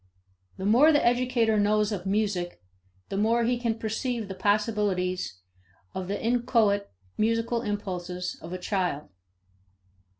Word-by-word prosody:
The 190 - -4
more 250 +10 +6
the 290 - +3
educator 240 -3 +2
knows 210 +1 +2
of 190 -2 -4
music 195 -3 -1 0.5
the 195 - -3
more 230 +3 +2
he 240 +1 +1
can 230 -2 -1
perceive 225 +1 -2
the - - -3
possibilities 205 - 0 0.6
of 185 -1 -4
the 200 +1 -2
inchoate 225 -4 +2 0.3
musical 230 +1 +1
impulses 180 -4 -4
of 165 - -8
a 185 - -3
child. 180 - -2
210 Hz, 130 wpm, -27 LUFS, 190-230 Hz, 0.6 s, more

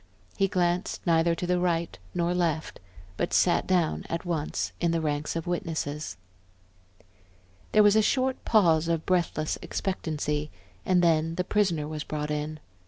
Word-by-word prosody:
He 195 - +2
glanced 180 0 -1
neither 165 0 +3
to 180 - -3
the 180 0 +1
right 170 -2 0 0.2
nor 175 +1 +1
left, 165 -3 -1 0.4
but - - -1
sat - - +3
down 175 -4 +1
at 165 +2 -3
once 160 -4 -2
in 170 - +2
the 165 0 +1
ranks 150 -1 -2
of 165 - -3
witnesses. 155 - -3 1.5
There 215 - +6
was 205 0 +5
a 220 - +6
short 260 +4 0
pause 165 -7 +4
of 165 -1 -1
breathless 170 -4 0
expectancy, 150 -5 -2 0.4
and 180 -1 +4
then 165 -1 +2
the 180 - 0
prisoner 180 -7 +1
was 155 -1 -4
brought 150 0 -4
in. 150 +1 -3
170 Hz, 155 wpm, -27 LUFS, 155-180 Hz, 1.5 s, There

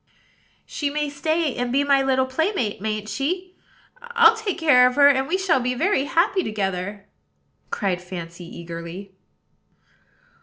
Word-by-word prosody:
"She 290 -2 -3
may 295 0 -2
stay, 315 +1 -1
and 245 0 -2
be 275 +3 +2
my 280 -1 +3
little 265 -1 +2
playmate, 260 - -2
mayn't 215 0 -3
she? 360 +10 -3 0.5
I'll 465 -2 +4
take 440 -4 -3
care 285 -7 +5
of 250 - -2
her; 285 -1 +7
and 265 -1 +3
we 355 +4 0
shall 380 -8 +2
be 250 0 -1
very 305 -1 +1
happy 355 +5 +1
together," 200 -2 -3 0.6
cried 185 -4 -2
Fancy 175 -1 -8
eagerly. 170 +3 -9
265 Hz, 145 wpm, -23 LUFS, 205-325 Hz, 0.6 s, her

